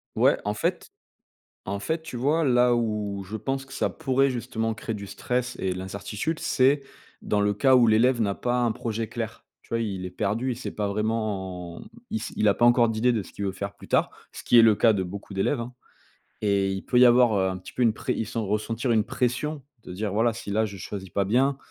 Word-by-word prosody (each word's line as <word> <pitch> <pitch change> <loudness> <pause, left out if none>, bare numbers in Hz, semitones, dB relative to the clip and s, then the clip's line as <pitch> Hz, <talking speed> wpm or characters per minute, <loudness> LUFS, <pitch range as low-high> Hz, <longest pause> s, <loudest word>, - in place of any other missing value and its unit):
Ouais, - - +4
en 105 - 0
fait - - -2 0.7
en 100 +1 -3
fait, 160 +10 -2
tu 155 -6 -7
vois? 150 +6 +2
Là 125 -2 +4
où 105 -4 -2
je 105 +4 -6
pense 135 +3 -3
que 135 - -13
ça - - 0
pourrait 135 -3 +1
justement 115 -2 -2
créer 115 0 -5
du 100 -1 -7
stress 125 +5 -2
et 95 -1 -1
l'incertitude 100 - -4
c'est 135 +2 +3 0.4
dans 105 - 0
le 105 0 +2
cas 130 +5 +4
où 125 -2 +6
l'élève 115 +3 +4
n'a 100 -2 +1
pas 125 +3 -1
un 120 -2 +2
projet 115 0 -3
clair, - - -6 0.2
tu - - -26
vois? 115 - 0
Il 95 -4 -3
est - - -4
perdu, 110 +7 -1
il 120 - -3
sait 125 - -6
pas 105 -1 -2
vraiment, 100 -5 -3 0.3
il 220 - -1
s - - -6
il 110 - +2
a 100 - +4
pas 120 - +3
encore 120 -1 +5
d'idée 115 +3 +2
de 110 - 0
ce - - -13
qu'il 100 - -5
veut 95 - 0
faire 100 +1 -6
plus - - -14
tard, - - +2 0.2
ce - - -9
qui 120 - +4
est 115 - +9
le 110 -1 +7
cas 115 +1 +4
de 95 - 0
beaucoup 100 +2 -8
d'élèves, 120 +7 +1
hein 120 +2 -6 0.7
et 100 -2 +2
il 95 0 -4
peut 125 - +2
y 125 - +8
avoir, 120 -3 +5
heu, 95 - +2
un 95 0 -3
petit 90 - -11
peu 125 - -4
une 115 -3 +4
pré - - -3
il 110 - -3
sent 115 - -3
ressentir 110 +3 -1
une 110 -2 +3
pression, 135 +4 -2 0.2
de 90 - -8
dire: 105 +2 -3
«Voilà, 115 +2 +2
si 110 -3 -7
là, 110 +2 +2
je 100 - -7
choisis 95 0 -7
pas 100 - 0
bien, 130 +7 +2
110 Hz, 245 wpm, -26 LUFS, 100-125 Hz, 0.7 s, est